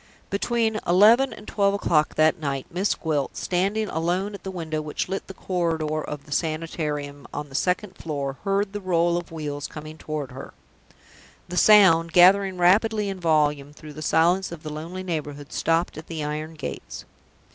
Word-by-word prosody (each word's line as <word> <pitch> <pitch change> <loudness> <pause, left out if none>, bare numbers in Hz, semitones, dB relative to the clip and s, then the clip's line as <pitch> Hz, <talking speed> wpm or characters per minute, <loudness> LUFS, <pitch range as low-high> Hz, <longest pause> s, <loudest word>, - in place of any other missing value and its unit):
Between 220 +1 0
eleven 220 +9 +6
and 210 - -11
twelve 200 -1 +1
o'clock 155 -6 +1
that 155 +3 +3
night, 140 -3 -3
Miss 190 +4 0
Gwilt, 150 -4 -2
standing 200 +4 0
alone 180 +5 -1
at 200 - -8
the 190 - -6
window 160 -4 -3
which 150 -1 -3
lit 195 - -4
the 190 - -9
corridor 160 -4 -1
of 150 -1 -7
the 150 - -16
Sanitarium 150 -3 -3
on 145 0 -5
the - - -15
second 180 +6 -1
floor, 140 -4 -4
heard 195 0 0
the 205 - -4
roll 170 -2 +2
of 175 -1 -4
wheels 150 -3 -4
coming 155 +1 -9
toward 150 -3 -4
her. 130 - -10 0.9
The 180 - -4
sound, 170 -6 +6
gathering 190 +1 +6
rapidly 205 +4 +3
in 195 -1 -5
volume 150 -4 +1
through 150 0 -11
the 155 - -9
silence 170 +5 +2
of 170 -2 -9
the 155 -1 -6
lonely 170 +5 -6
neighborhood, 145 -5 -5
stopped 165 0 0
at 155 - -12
the 160 -2 -4
iron 155 +2 -4
gates. 155 - -7
165 Hz, 175 wpm, -24 LUFS, 150-190 Hz, 0.9 s, eleven